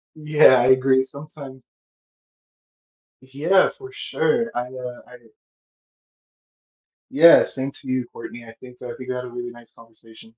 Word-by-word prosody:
Yeah, 150 -4 +4
I 120 - +1
agree, 130 0 +3
sometimes 140 -2 -12 1.6
Yeah, 145 +9 +1
for 395 -1 -13
sure, 400 - -1
I, 120 - -1
uh 125 0 -9
I 125 - -14
get 115 -2 -25 1.8
Yeah, 165 +4 +7
same 135 0 -6
to 135 - -16
you, 130 -1 -2
Courtney, 120 +1 -10
and 115 -1 -13
I - - -18
think 125 -1 -14
that 125 -1 -8
we 130 - -8
got 125 0 -5
a 125 - -9
really 120 0 -7
nice 120 -1 -17
conversation. 115 0 -19
130 Hz, 150 wpm, -21 LUFS, 120-140 Hz, 1.8 s, Yeah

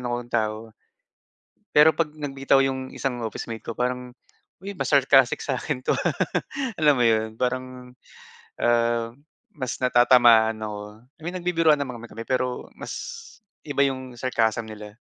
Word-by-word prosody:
akong 120 0 -4
tao. 110 0 -2 1.0
Pero 150 +2 +6
pag 155 -3 0
nagbitaw 135 -2 +1
yung 130 -1 -2
isang 130 -3 -3
officemate 115 +1 -6
ko - - -4
parang, 125 +1 -3 0.5
uy 200 0 -7
mas - - -3
sarcastic 135 -2 +4
saakin 135 0 -2
to, - - +1
ah. - - 0 0.6
Alam 150 -2 +5
mo - - +4
yun, 110 -1 +2
parang, 125 0 -3 0.7
ah, 115 -1 +2 0.4
mas 130 -5 -4
natatamaan 120 -3 +5
ako. 105 0 -7 0.2
I - - -29
mean 175 - -4
nagbibiruan 165 -3 +3
naman 130 -4 -4
kami 120 - -10
kami, 115 +1 -8
pero 125 0 -2
mas - - -6 0.7
iba 145 -2 +1
yung 130 -2 -3
sarcasm 115 -2 0
nila. 105 0 -10
125 Hz, 145 wpm, -24 LUFS, 115-135 Hz, 1.0 s, Pero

